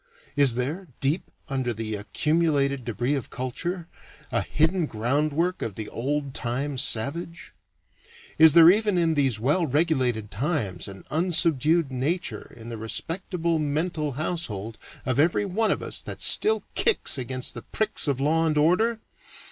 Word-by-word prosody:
Is 140 -5 +4
there, 150 +10 -3
deep 145 +6 -1 0.2
under 130 -5 -2
the 110 0 -4
accumulated 140 +4 0
debris 120 +4 -1
of 135 -5 -3
culture, 165 +8 -4 0.4
a - - +1
hidden 160 +2 0
groundwork 150 +10 -1
of 105 - -4
the 110 -1 -6
old 140 +3 -3
time 130 +3 -3
savage? 165 +11 0 0.9
Is 160 -2 +8
there 170 +1 +9
even 210 -1 +1
in 165 -2 +2
these 135 -7 +1
well 150 +9 +1
regulated 130 -8 0
times 110 - -2
an 95 -1 -11
unsubdued 165 -2 +2
nature 130 - -3
in 115 0 -10
the 115 - -6
respectable 165 - -2
mental 150 0 -2
household 115 - -4 0.3
of 130 0 0
every 165 +6 +2
one 215 +3 0
of - - -1
us - - 0
that - - -8
still 440 +1 +5
kicks 445 - +2
against 130 0 -2
the - - -8
pricks 215 -6 0
of 140 -2 0
law 160 +4 +2
and 155 -1 0
order? 215 +9 +2
145 Hz, 150 wpm, -25 LUFS, 125-170 Hz, 0.9 s, there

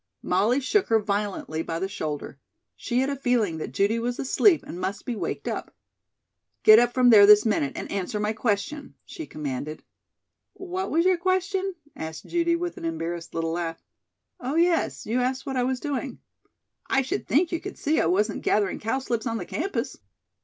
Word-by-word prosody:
Molly 215 +8 +2
shook 375 +10 +1
her 225 -1 +4
violently 200 -6 -2
by 165 0 -3
the 190 +3 -2
shoulder. 150 -7 -5 0.4
She 245 +2 -1
had 265 - 0
a - - -2
feeling 240 -11 0
that - - -5
Judy 210 +4 +1
was 240 +1 -2
asleep 330 +6 +3
and 175 - -7
must 190 +2 -3
be 245 - -3
waked - - -4
up. - - -4 0.9
"Get 215 +1 +9
up 240 0 +3
from 250 -1 +4
there 205 -2 +9
this 210 +1 +8
minute 150 -11 +1
and - - -6
answer 200 +2 -2
my 210 +1 0
question," 230 +6 -2
she 320 -3 -8
commanded. 150 +1 -5 0.7
"What 375 0 -4
was 330 +3 +2
your 370 -1 +4
question?" 375 +1 0 0.2
asked 160 -1 -7
Judy 340 -1 +1
with 350 0 -4
an - - -6
embarrassed 165 +1 -4
little 165 0 -1
laugh. 165 -1 -3 0.6
"Oh, 260 +4 -3
yes, 335 0 +1
you 235 +4 0
asked 255 +2 -1
what 270 -2 -3
I 255 - +1
was 255 0 -1
doing. 275 -3 -3 0.7
I 270 - +3
should 260 - -3
think 325 +6 +2
you 335 - -1
could 395 - -7
see 305 +2 +1
I - - +1
wasn't 205 +4 +1
gathering 205 -2 +1
cowslips 235 0 -2
on 230 0 -1
the 180 - -5
campus." 385 - -3
235 Hz, 190 wpm, -25 LUFS, 190-295 Hz, 0.9 s, Get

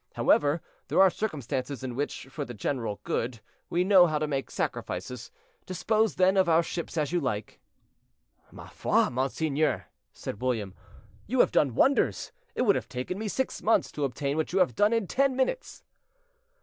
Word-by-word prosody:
However, 145 +3 +3 0.2
there - - +1
are 190 -1 +7
circumstances 140 - -3
in 130 -2 -4
which, 145 0 -3
for 145 - -4
the 120 -3 -8
general 115 -2 -3
good, 115 0 -2 0.3
we 175 +1 +1
know 185 -2 +6
how 155 -2 0
to 155 - 0
make 140 -2 -3
sacrifices. 125 -2 -4 0.4
Dispose, 215 +4 +1
then, 190 +1 +3
of 185 -2 +4
our 165 +1 +4
ships 170 0 -5
as 150 -1 0
you 175 - +1
like." 125 -8 -3 0.9
"Ma - - -11
foi, - - +1
monseigneur," 140 +2 0 0.3
said 105 - -7
William, 115 -7 -1 0.5
"you 255 +4 -1
have - - +3
done 135 -6 +2
wonders. 275 - +2 0.2
It - - +1
would 205 -5 +4
have - - -3
taken 130 +9 -4
me 220 - -3
six 265 +5 -2
months 225 - +2
to 150 - -4
obtain 140 +2 -2
what 160 - -1
you 185 - 0
have 185 -2 +3
done 205 +1 +3
in 230 -3 +1
ten 270 +6 +1
minutes." 265 - -2
155 Hz, 175 wpm, -28 LUFS, 130-195 Hz, 0.9 s, are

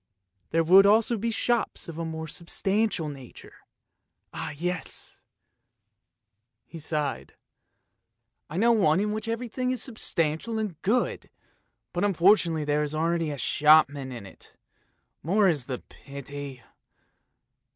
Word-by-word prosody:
There 165 0 +2
would 190 +4 +7
also 220 +3 +4
be 230 +2 -2
shops 235 +1 -1
of 165 -1 -7
a 165 - -2
more 160 0 -5
substantial 190 +2 -1
nature! 135 -4 -11 0.8
Ah, - - -4
yes! 180 +2 -4 0.7
" 110 +2 -56
he 165 - -10
sighed, 150 -2 -3 0.6
" 115 +1 -54
I 155 - -5
know 230 +4 +4
one 190 -7 +3
in 210 +1 0
which 215 +1 -4
everything 245 +2 -2
is 255 -1 0
substantial 215 - -1
and 210 -7 -4
good, 240 +6 0 0.6
but 175 - -1
unfortunately 175 -4 +3
there 150 0 +1
is 150 0 -2
already 165 0 0
a 145 - -4
shopman 145 -2 +3
in 120 -5 -8
it, 95 - -15 0.7
more 195 +5 +3
is 150 -8 +1
the 130 -2 -3
pity 140 -2 -9
165 Hz, 130 wpm, -27 LUFS, 145-210 Hz, 0.8 s, would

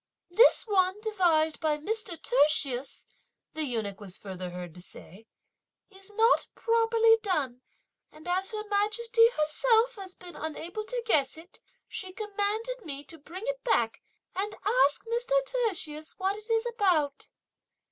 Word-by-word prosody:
"This 455 +7 +6
one 380 -2 +2
devised 345 -8 +2
by 310 -2 +1
Mr. 390 +1 -3
Tertius," 275 -1 +1 0.5
the 315 -1 -2
eunuch 220 -6 -3
was 195 -3 -7
further 185 -2 -6
heard 175 -1 -7
to 180 - -12
say, 195 +4 -11 0.6
"is 385 +1 -10
not 455 +2 +4
properly 455 -1 +4
done; 290 - -1 0.5
and 310 +2 -14
as 370 +2 0
Her 430 -1 -4
Majesty 450 +3 +3
herself 455 +8 +2
has 380 -2 -8
been 355 -1 -12
unable 335 +7 -5
to 485 +1 -3
guess 305 -9 +1
it 335 +3 -13 0.3
she 375 -2 -4
commanded 430 +4 -3
me 285 -4 -6
to 320 +3 -11
bring 345 +7 -9
it - - -3
back, 235 - +1 0.3
and 405 +3 -2
ask 420 - +3
Mr. 475 +2 -1
Tertius 365 -12 -2
what 385 0 0
it 425 +2 -12
is 450 +1 +2
about." 365 -12 +1
375 Hz, 145 wpm, -29 LUFS, 300-450 Hz, 0.6 s, This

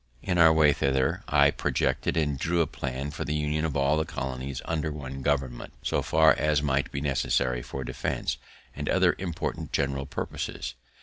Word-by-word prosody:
In 90 -2 0
our 80 -1 +8
way 80 -2 +5
thither, 65 -1 +1
I - - +5
projected - - 0
and 75 -4 0
drew 85 +3 +1
a - - +3
plan 70 0 -4
for - - -4
the 75 - -2
union 75 +1 0
of 75 -3 -1
all 70 +2 +3
the 80 - +2
colonies 65 -4 -4
under 80 -2 -1
one 70 -2 -6
government, 65 -4 -1
so - - +1
far 80 0 +5
as 75 -1 +3
might 70 -1 0
be 70 - -3
necessary 65 -3 +1
for 65 +2 -6
defense, - - -2 0.4
and - - -3
other - - +4
important 90 -4 -4
general 70 0 -1
purposes. 65 - -4
70 Hz, 180 wpm, -27 LUFS, 65-80 Hz, 0.4 s, our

